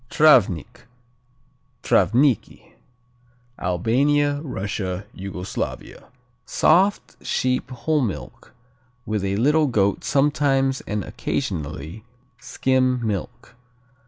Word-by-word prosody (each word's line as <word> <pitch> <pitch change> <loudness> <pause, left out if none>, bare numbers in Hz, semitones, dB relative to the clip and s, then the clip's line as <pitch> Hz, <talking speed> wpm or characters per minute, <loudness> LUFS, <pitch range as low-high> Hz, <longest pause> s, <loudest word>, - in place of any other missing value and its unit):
Travnik, 120 - +3 1.0
Travnicki 130 +2 +1 0.9
Albania, 145 - +1
Russia, 100 - -4
Yugoslavia 95 -1 -6 0.4
Soft, 190 +5 +1
sheep 125 0 -1
whole 145 +5 -1
milk 115 +1 -6 0.5
with 105 -2 -2
a 100 0 -1
little 150 +7 +3
goat 100 -5 +1
sometimes 135 -2 +1
and 105 -1 -2
occasionally 85 - -4 0.4
skim 130 -2 0
milk. 100 -4 -5
125 Hz, 75 wpm, -22 LUFS, 100-145 Hz, 1.0 s, Travnik